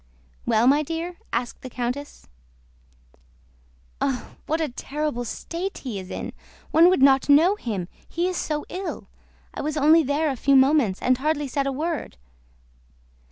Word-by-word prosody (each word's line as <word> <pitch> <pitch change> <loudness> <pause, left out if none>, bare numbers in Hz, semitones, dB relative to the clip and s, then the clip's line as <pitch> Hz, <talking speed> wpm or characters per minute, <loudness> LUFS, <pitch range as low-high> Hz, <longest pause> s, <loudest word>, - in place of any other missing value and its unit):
"Well, 220 +2 +3
my 280 +4 +5
dear?" 330 +3 -4
asked 240 +1 -3
the 255 - -7
countess. 250 +4 -5 1.7
"Oh, 265 -3 -1 0.2
what 315 +2 0
a 320 - 0
terrible 285 0 -3
state 345 - -5
he 235 -7 -5
is 185 0 -9
in! - - -5 0.4
One 335 +2 +7
would 365 -8 +3
not 270 0 +5
know 325 +8 +6
him, 210 - -4 0.2
he 345 +2 -1
is 370 - -2
so 300 -3 -2
ill! 380 +1 -5 0.4
I - - -5
was 305 +1 -2
only 310 +3 +6
there 295 +1 0
a - - -3
few 275 +3 +3
moments 265 -7 +4
and 255 0 +3
hardly 295 0 0
said 275 +1 -1
a - - 0
word..." 310 - -3
285 Hz, 160 wpm, -24 LUFS, 255-320 Hz, 1.7 s, One